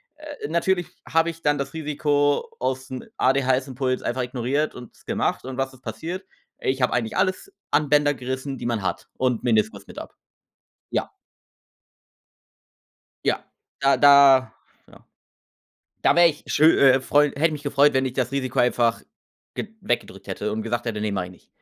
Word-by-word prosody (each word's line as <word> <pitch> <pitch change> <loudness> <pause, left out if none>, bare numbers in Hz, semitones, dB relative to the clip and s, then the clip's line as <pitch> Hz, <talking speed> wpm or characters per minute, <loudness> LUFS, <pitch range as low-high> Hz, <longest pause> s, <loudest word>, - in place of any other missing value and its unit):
Äh, 300 - -8
natürlich 175 +1 0 0.2
habe 165 +1 +2
ich 165 0 -8
dann 145 0 +2
das 140 +1 -4
Risiko 145 -2 0
aus 130 +1 -2
'n 130 -1 -7
ADHS-Impuls 130 -1 +1
einfach 125 +2 -1
ignoriert 130 +5 -2
und 125 -2 -11
es - - -24
gemacht, - - -1
und 130 0 -6
was 135 0 -2
ist 130 - -18
passiert? 165 - -6 0.4
Ich 130 0 0
habe - - +2
eigentlich 115 -2 -1
alles 190 - 0 0.2
an 150 -1 +2
Bänder 145 0 +4
gerissen, 130 +1 -5
die - - -6
man 115 -4 -1
hat - - -3
und 125 -3 0
Meniskus 110 -3 0
mit - - -13
ab. - - -8 0.8
Ja. - - -2 2.1
Ja, - - 0 0.3
da 140 0 +3
da, 140 -2 +6 0.3
ja. - - -19 1.0
Da - - +4
wäre 175 0 +7
ich 150 -3 -4
schö 155 - +3
äh, 135 -1 +6
freu 145 +2 +3
hätte 160 +3 +2
mich 150 -1 -6
gefreut, 145 0 +3
wenn 130 0 +2
ich 130 - -3
das 130 0 -1
Risiko 130 -3 -2
einfach 120 -1 +2 0.5
ge 215 - -4
weggedrückt 100 -5 -3
hätte 105 +2 -3
und 110 +1 -2
gesagt 120 +1 -2
hätte: 110 -2 -3
„Ne, 105 -1 -1
mache 95 -2 -2
ich 90 - -12
nicht“. 90 - -20
135 Hz, 170 wpm, -23 LUFS, 125-145 Hz, 2.1 s, wäre